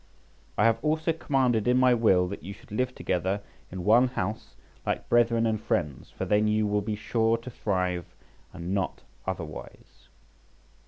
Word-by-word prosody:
I 105 - +3
have 115 +1 +2
also 160 +2 +1
commanded 130 -8 +1
in 125 +1 +4
my 130 -1 +5
will 95 -6 +4
that 100 - -6
you 100 - -7
should 100 - -18
live 125 +4 -1
together 95 +3 -1 0.3
in 90 -1 -5
one 120 +6 +5
house 110 -4 -4 0.3
like - - -2
brethren 115 -1 +4
and 110 -2 0
friends, 75 - -2
for - - -5
then 105 +1 +3
you 105 0 +2
will 105 0 +1
be 105 +1 -2
sure 115 +2 +1
to 120 +2 -9
thrive 90 -5 -1 0.5
and 85 +3 -5
not 95 -3 -2 0.2
otherwise." 85 -5 -7
110 Hz, 165 wpm, -27 LUFS, 95-120 Hz, 0.5 s, my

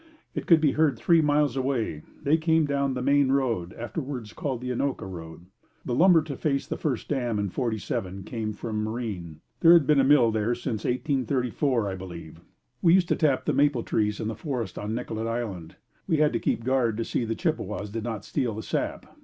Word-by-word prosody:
It - - -5
could 165 -2 +7
be 155 -3 +3
heard 155 -1 +2
three 170 -2 +4
miles 145 -3 +2
away. 130 - -1 0.2
They 145 +3 +4
came 160 -1 +2
down 140 -2 0
the 125 - -3
Main 140 0 +3
Road, 115 -11 0
afterwards 125 -2 -5
called 135 -5 -3
the 125 0 -3
Anoka 135 -1 -2
road. 85 -2 -9 0.4
The 125 - -2
lumber 170 +3 +5
to 145 -3 -6
face 140 0 -1
the - - -4
first 130 -7 -2
dam 120 -6 -1
in 100 -1 -1
'47 100 -5 -3
came 110 0 -4
from 105 0 -3
Marine. 105 -9 -5 0.2
There 165 0 +7
had 170 -4 +6
been 150 0 +4
a - - +5
mill 130 -4 +5
there 110 +2 0
since 110 -3 -4
1834, 130 -2 0
I 95 - -2
believe. 85 -3 -9 0.4
We 170 +1 +6
used 180 -2 +2
to - - +3
tap 145 -5 +1
the - - +1
maple 140 -5 +2
trees 105 -1 0
in - - -2
the 110 - -2
forest 120 - -4
on 105 +2 -3
Nicollet 115 -2 -3
Island. 105 -8 -4 0.3
We 160 - +2
had 150 -2 +3
to 115 - 0
keep 115 - -1
guard 125 -3 +1
to 115 - -2
see - - -1
that 120 - -2
the 115 - -1
Chippewas 105 - -2
did 110 0 -4
not 110 -4 -4
steal 125 -7 -1
the 110 - -5
sap. - - -3
120 Hz, 210 wpm, -26 LUFS, 110-145 Hz, 0.4 s, could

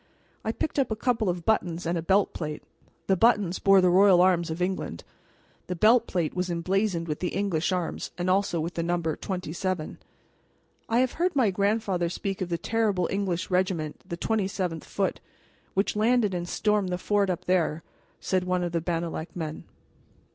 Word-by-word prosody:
I 220 - 0
picked 295 +5 -2
up 270 - +2
a 220 - -1
couple 225 -3 0
of 175 -1 -3
buttons 175 -6 0
and 170 +1 0
a 165 - -1
belt 190 +4 +2
plate. 150 -2 -5 0.4
The 190 - +3
buttons 205 -4 +3
bore 195 -1 +6
the 180 -1 +4
royal 190 0 +6
arms 180 -2 +3
of 160 +2 -4
England; 185 +1 -2 0.6
the 180 - -3
belt 225 +6 +4
plate 170 -4 -1
was 180 0 -2
emblazoned 175 +1 0
with 150 -1 -3
the 180 - -2
English 190 -4 0
arms 180 -3 -2
and 175 0 -2
also 185 -2 +2
with 165 +3 -3
the 170 - -2
number 170 -2 -1
"27." 180 -2 -4 0.9
"I 230 +1 +3
have 255 - +1
heard 350 0 0
my 240 -7 +3
grandfather 200 -3 0
speak 195 +2 -4
of 180 - -2
the 170 - 0
terrible 210 -4 0
English 195 -3 -2
regiment, 180 -5 0
the 170 -2 -6
27th 190 -6 -2
Foot, - - -1 0.6
which 195 +2 +1
landed 220 -1 +2
and 175 -1 -3
stormed 210 -3 +1
the 180 - -1
fort 200 +1 +1
up 180 0 -3
there," 165 -3 +1 0.4
said 185 -1 0
one 180 0 0
of 175 - -2
the 170 -1 -1
Bannalec 165 -1 -3
men. 160 -3 -5
185 Hz, 185 wpm, -27 LUFS, 170-205 Hz, 0.9 s, bore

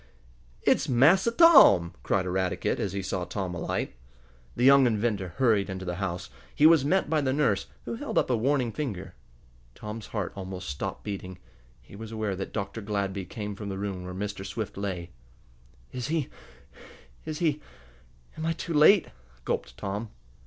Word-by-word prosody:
"It's - - +2
Massa 155 - +5
Tom!" 235 - +7
cried 95 -2 0
Eradicate, 95 0 -1
as 100 - -2
he 100 -1 -3
saw 90 -1 -2
Tom 90 0 -4
alight. 85 - -3 0.6
The 120 - -1
young 135 0 +7
inventor 105 -6 -1
hurried 110 -6 +2
into 95 0 -5
the 90 -1 -3
house. 90 -4 -4 0.2
He 150 - +4
was 160 -3 +7
met 185 +7 +2
by 155 0 +1
the 130 -2 0
nurse, 130 -9 +1 0.2
who 120 - -4
held 115 - -4
up - - +3
a - - +3
warning 125 +1 +1
finger. 110 -10 -5 0.6
Tom's 105 +1 -7
heart 105 -5 -4
almost 95 -2 -6
stopped 70 - -5
beating. 95 -3 -6 0.5
He 65 - -14
was 110 +1 -8
aware 110 -3 -2
that 95 +1 -5
Dr. 100 +1 -4
Gladby 100 -2 -2
came 105 +1 -6
from 100 0 -6
the 95 - -4
room 95 -2 -4
where 90 0 -7
Mr. 100 0 -4
Swift 100 +2 -5
lay. 90 -4 -4 0.8
"Is 125 0 -4
he 155 -3 -1 0.9
is 155 -1 -5
he 155 -3 0 0.8
am 160 - -2
I 165 - +1
too 170 +1 -5
late?" 160 +6 +6 0.4
gulped - - -3
Tom. 100 +3 -4
105 Hz, 170 wpm, -27 LUFS, 95-135 Hz, 0.9 s, Tom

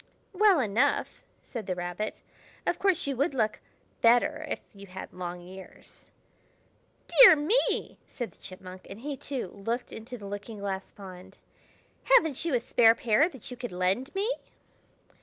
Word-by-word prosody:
"Well 395 -3 +5
enough!" 240 +4 0 0.2
said 230 -5 -7
the 185 - -1
Rabbit. 175 +4 -4 0.4
"Of - - 0
course, 385 -3 +2
you 280 -1 -1
would 280 +2 0
look 215 -4 0 0.4
better 235 +1 +3
if - - -2
you 200 -1 -12
had 185 +1 -9
long 180 -1 -6
ears." 190 +1 -13 1.0
"Dear - - +9
me!" 320 +12 +1
said 240 -3 -6
the - - -26
Chipmunk; 185 0 -10
and 200 +3 -9
he, 285 +1 -4
too, 265 -6 -5
looked 230 +6 -4
into 240 +3 -8
the 205 - -10
looking 205 +2 -7
glass 195 -1 -4
pond. 190 -1 -12 0.8
"Haven't 320 - +3
you 330 -6 0
a - - +3
spare 230 -1 +5
pair 240 +8 +3
that 265 - -12
you 250 - -7
could 245 -3 -6
lend 190 - -1
me?" 395 +2 0
225 Hz, 160 wpm, -28 LUFS, 190-275 Hz, 1.0 s, Dear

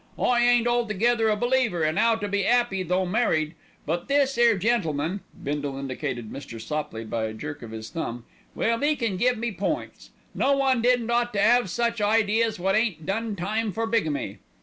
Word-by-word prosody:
I 240 -1 +2
ain't 240 -1 +4
altogether 235 -1 +2
a 210 - +3
believer 240 -7 +1
in 155 +1 +1
'ow 230 -1 +4
to 205 -2 -4
be 200 0 0
'appy 240 -4 +2
though 185 +1 0
married; 175 -6 +1 0.3
but 170 +3 -2
this 275 -1 +2
'ere 235 -2 +4
gentleman 185 -5 0 0.2
(Bindle 145 -1 -3
indicated 130 -4 -4
Mr. 130 -5 -8
Sopley 115 -2 -4
by 110 0 -2
a 110 - -4
jerk 145 +5 -6
of 115 - -8
his 110 0 -8
thumb) 120 -7 -4 0.3
well, 230 +3 0
'e 300 +1 +3
can 230 -8 -1
give 245 +5 +2
me 235 +1 -2
points. 205 - -4 0.2
No 275 +1 +2
one 265 -3 +2
didn't 240 -1 +2
ought 240 0 +1
to 200 - -1
'ave 240 +2 +4
such 235 +4 -1
ideas 220 +1 +2
wot 190 +2 +1
ain't 215 -8 0
done 220 +2 -2
time 210 +4 -1
for 225 +5 -2
bigamy. 220 -11 -1
210 Hz, 190 wpm, -25 LUFS, 155-235 Hz, 0.3 s, ain't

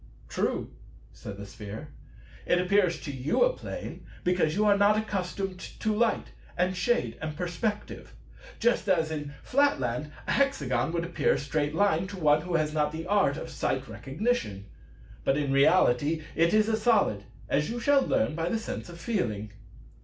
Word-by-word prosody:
"True," - - -2 0.4
said 100 -1 -8
the 100 - -7
Sphere; 105 +1 -8 0.6
"it 175 - +4
appears 180 -2 +2
to 145 - -5
you 135 - +1
a - - +3
Plane, - - -7 0.2
because 175 -3 +2
you 210 +1 +2
are 205 -1 +5
not 205 +1 +4
accustomed 195 -3 -3
to 215 +3 -3
light 225 +2 +1 0.3
and 180 +1 +1
shade 240 +7 0
and 155 -1 -4
perspective; 180 +5 -3 0.4
just 230 -4 +2
as 165 -4 +2
in 145 -2 -5
Flatland 250 - +1
a - - -2
Hexagon 275 -10 +1
would 170 -1 0
appear 170 -4 +1
a - - 0
Straight 145 +1 -1
Line 190 -2 +2
to 200 0 -8
one 150 -3 +4
who 180 +1 -3
has 155 -1 +1
not 150 -1 +1
the 160 +1 -5
Art 195 -7 +2
of - - -6
Sight - - -2
Recognition. 135 - -2 0.6
But 135 - +2
in 140 -2 0
reality 145 +1 +3
it 165 +1 +3
is 215 0 +4
a 220 -1 +1
Solid, 215 - +2 0.2
as 150 +1 +1
you 240 +1 -3
shall 280 +2 +4
learn 270 - +1
by 165 +2 -1
the 225 - 0
sense 220 - -6
of 170 -1 -10
Feeling." 110 - -2
175 Hz, 175 wpm, -28 LUFS, 150-210 Hz, 0.6 s, are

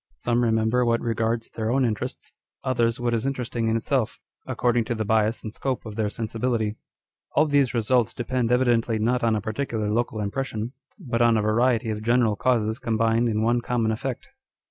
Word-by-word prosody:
Some 120 - 0
re 115 - +2
member 110 +2 +2
what 115 -1 +2
regards 115 0 -1
their 110 -1 -3
own 130 +2 +2
interests, 110 -3 -4 0.3
others 120 -2 +1
what 120 -1 0
is 115 +3 0
interesting 125 -4 -2
in 110 0 +2
itself, 115 -1 -1 0.3
according 120 -1 +1
to 120 - -2
the 110 -1 -2
bias 110 +1 +1
and 110 - -6
scope 130 -1 -3
of 110 -2 -7
their 110 -1 0
sensibility. 110 0 -2 0.6
All 150 - +5
these 145 -4 +2
results 120 0 +2
depend 120 -1 -1
evidently 120 -2 +2
not 120 +3 +1
on 115 -1 +3
a 105 - -1
particular 110 -1 -2
local 115 0 -1
impression, 110 +2 -3 0.2
but 120 - -2
on 115 -1 +5
a - - +2
variety 115 +1 +2
of 105 0 -4
general 115 -1 +2
causes 110 0 +1
combined 115 0 +1
in 110 0 0
one 120 +1 +2
common 115 -2 0
effect. 130 - -4
115 Hz, 190 wpm, -25 LUFS, 110-125 Hz, 0.6 s, All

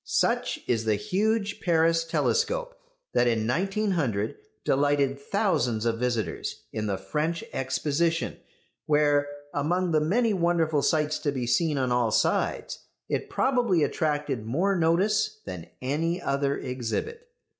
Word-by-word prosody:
Such - - 0
is 115 -2 0
the 110 -1 +3
huge 205 - 0
Paris 165 -1 +3
telescope 485 - 0 0.4
that 120 - +3
in 115 -2 +1
1900 165 - 0 0.3
delighted 140 0 +2
thousands 140 - 0
of 115 -1 0
visitors 120 -3 -2
in 110 -1 -2
the 100 -2 -1
French 150 - -2
Exposition, 160 +5 0 0.5
where, 145 -1 +3 0.3
among 175 +5 0
the 155 -1 +3
many 220 +8 +2
wonderful 170 -4 +2
sights 155 0 +1
to 145 - 0
be 130 -3 -2
seen 150 +5 +1
on 130 -2 0
all 120 -2 +2
sides, 110 - 0 0.3
it - - -2
probably 240 - +2
attracted 145 -5 -1
more 170 - +1
notice 205 +6 +2
than 90 -3 -7 0.2
any 165 +6 0
other 140 -1 0
exhibit. 130 - -4
150 Hz, 130 wpm, -27 LUFS, 125-185 Hz, 0.5 s, the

